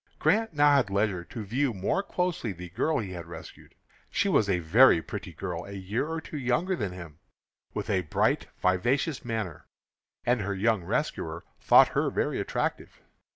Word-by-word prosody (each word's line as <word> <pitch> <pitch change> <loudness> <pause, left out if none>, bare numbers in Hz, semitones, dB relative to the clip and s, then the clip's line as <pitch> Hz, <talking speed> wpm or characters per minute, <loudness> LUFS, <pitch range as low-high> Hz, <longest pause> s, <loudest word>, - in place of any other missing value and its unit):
Grant 225 -6 +1
now 145 -1 +5
had 130 -7 +1
leisure 100 -3 0
to 110 - -7
view 125 +3 0
more 100 - 0
closely 180 - -2
the 90 0 -9
girl 155 - 0
he 100 -5 -3
had 85 -2 -7
rescued. 85 -1 -11 0.3
She 205 - 0
was 110 - +3
a 95 - +3
very 90 +5 +6
pretty - - -7
girl, 90 -2 -5
a 100 - -9
year 100 +8 -2
or 165 0 -3
two 155 -1 -7
younger 135 +9 +1
than 105 - -3
himself, 85 -4 -10 0.6
with - - -3
a 95 - +1
bright, 80 - 0
vivacious 120 - +1
manner, 110 -9 -4 0.6
and 120 -2 +2
her 100 0 -2
young 110 -1 +1
rescuer - - -2 0.2
thought - - +6
her - - 0
very - - -1
attractive. - - -3
105 Hz, 175 wpm, -28 LUFS, 90-140 Hz, 0.6 s, very